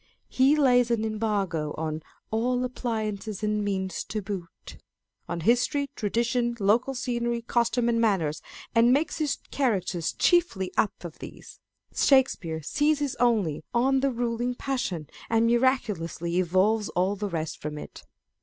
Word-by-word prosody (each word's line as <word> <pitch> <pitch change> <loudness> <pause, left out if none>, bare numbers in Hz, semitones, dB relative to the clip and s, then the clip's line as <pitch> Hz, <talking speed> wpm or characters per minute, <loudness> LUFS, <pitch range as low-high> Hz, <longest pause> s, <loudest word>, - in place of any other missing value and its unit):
He 265 +3 +4
lays 250 -5 +4
an 225 -2 +1
embargo 205 -8 -1
on 155 0 -3 0.2
" - - -43
all 245 +3 +1
appliances 220 -4 -3
and 210 0 0
means 190 -3 -2
to 215 - -3
boot," 190 -4 -7 0.5
on 175 -1 -3
history, 245 - +2
tradition, 235 +2 0
local 230 +7 +2
scenery, 240 -2 -2
costume 235 +1 +1
and 230 -1 +2
manners, 165 -9 +1 0.3
and 230 +1 +5
makes 300 +5 +1
his 300 -2 0
characters 195 - 0
chiefly 325 - +2
up 205 - 0
of 165 - -9
these. - - -11 0.3
Shakespeare 185 - +2
seizes 290 - +1
only 220 -12 +1
on 265 +3 +3
the 275 +1 +2
ruling 240 0 -2
passion, 220 - -3 0.2
and 230 0 +3
miraculously 210 - +1
evolves 190 +5 +2
all 185 +3 0
the 205 0 -3
rest 160 -3 -4
from 150 0 -5
it. - - -9
225 Hz, 140 wpm, -27 LUFS, 185-245 Hz, 0.5 s, and